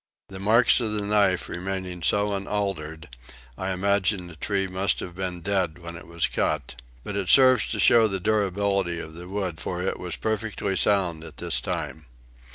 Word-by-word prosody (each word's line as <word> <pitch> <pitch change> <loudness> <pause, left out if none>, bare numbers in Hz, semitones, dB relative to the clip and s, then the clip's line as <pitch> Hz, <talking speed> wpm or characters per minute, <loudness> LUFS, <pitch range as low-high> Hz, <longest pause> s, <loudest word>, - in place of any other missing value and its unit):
The 95 - -8
marks 110 +7 +4
of 110 -3 -2
the 105 -1 -2
knife 100 -3 +2
remaining 90 -1 -4
so 105 +4 +1
unaltered, 95 -6 -3 0.5
I 95 +6 -3
imagine 95 0 +1
the 85 -2 -11
tree 95 +4 -1
must 95 +1 0
have 90 - -6
been 90 -1 -4
dead 95 -4 0
when 85 -1 -9
it 85 -1 -11
was 85 -1 0
cut; 75 -5 -1 0.3
but 105 - -5
it 100 -3 -2
serves 130 -4 +6
to 110 - -3
show 115 +2 +6
the 95 -2 -2
durability 100 -3 0
of 80 -1 -8
the 85 +2 -9
wood 95 -4 -3
for 90 0 -3
it 95 - -2
was 90 -2 -3
perfectly 110 -3 -2
sound 90 -5 +1
at 80 -2 -11
this - - -1
time. 80 -3 -4
95 Hz, 180 wpm, -25 LUFS, 85-100 Hz, 0.5 s, serves